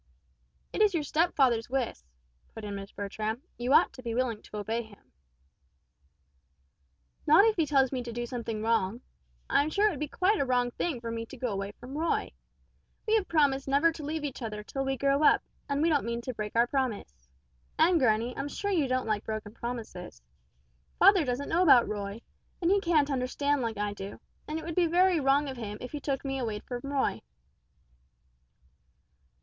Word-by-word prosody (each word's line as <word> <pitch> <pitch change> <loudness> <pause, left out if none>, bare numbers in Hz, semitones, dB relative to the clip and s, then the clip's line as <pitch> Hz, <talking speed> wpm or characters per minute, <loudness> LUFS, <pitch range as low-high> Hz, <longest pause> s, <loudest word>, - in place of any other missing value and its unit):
"It - - -1
is 415 -4 +4
your 315 - 0
stepfather's 275 -7 +2
wish," 260 -3 -1 0.6
put 220 - -8
in 205 - -5
Miss 195 0 -7
Bertram; 215 +4 -4 0.2
"you 245 +2 -1
ought - - +5
to 255 - -11
be 230 -2 -4
willing 240 -4 -1
to 210 - -9
obey 220 +3 -2
him." 220 -3 -17 2.2
"Not 315 +8 +7
if 445 -1 +3
he 325 -3 +1
tells 270 -3 +3
me 260 -2 -2
to 240 -1 -6
do 240 +1 -3
something 230 -3 -4
wrong. 220 -4 +2 0.5
And - - +3
I'm 290 +2 +1
sure 405 +6 +2
it 425 - +4
would 295 - -6
be 300 - -2
quite 380 +8 +1
a - - +3
wrong 250 -2 +1
thing 270 -2 -3
for 230 -1 -4
me 230 0 -4
to - - -11
go 250 - -2
away 200 0 -4
from 255 +6 -10
Roy. 325 +2 0 0.8
We 435 - +2
have 430 -4 +2
promised 280 -4 +2
never 285 +5 +4
to 320 - -9
leave 305 +1 -3
each 275 -2 -5
other 210 -2 -5
till 270 +5 -3
we 270 0 -1
grow 275 +3 +2
up, 305 - +5 0.3
and 280 +2 +1
we 335 - +4
don't 295 -3 +2
mean 235 0 -3
to 255 +1 -5
break 210 -1 -5
our 235 +1 +5
promise. 215 - -3 0.5
And, 335 +2 +4
granny, 235 -1 +2
I'm 280 - -3
sure 405 +6 -3
you 320 -8 +2
don't 255 0 0
like 215 -2 -1
broken 215 -1 -5
promises. 225 - -7 0.7
Father 385 -2 +6
doesn't 255 +1 -2
know 335 +2 +2
about 270 -9 +6
Roy, 205 +1 -4 0.4
and 350 0 +2
he 400 0 +3
can't 310 -5 +2
understand 275 +2 0
like 225 -3 -2
I 205 0 -1
do, 195 0 -8 0.3
and 305 - -3
it 320 - -6
would 335 - -4
be 345 0 +3
very 355 +1 +4
wrong 280 +1 +3
of 265 -2 -6
him 210 -3 -5
if 250 - -7
he 295 - -4
took 275 -1 -3
me 270 0 -2
away 220 -4 -2
from 245 0 -6
Roy!" 275 -2 0
260 Hz, 200 wpm, -29 LUFS, 225-300 Hz, 2.2 s, Not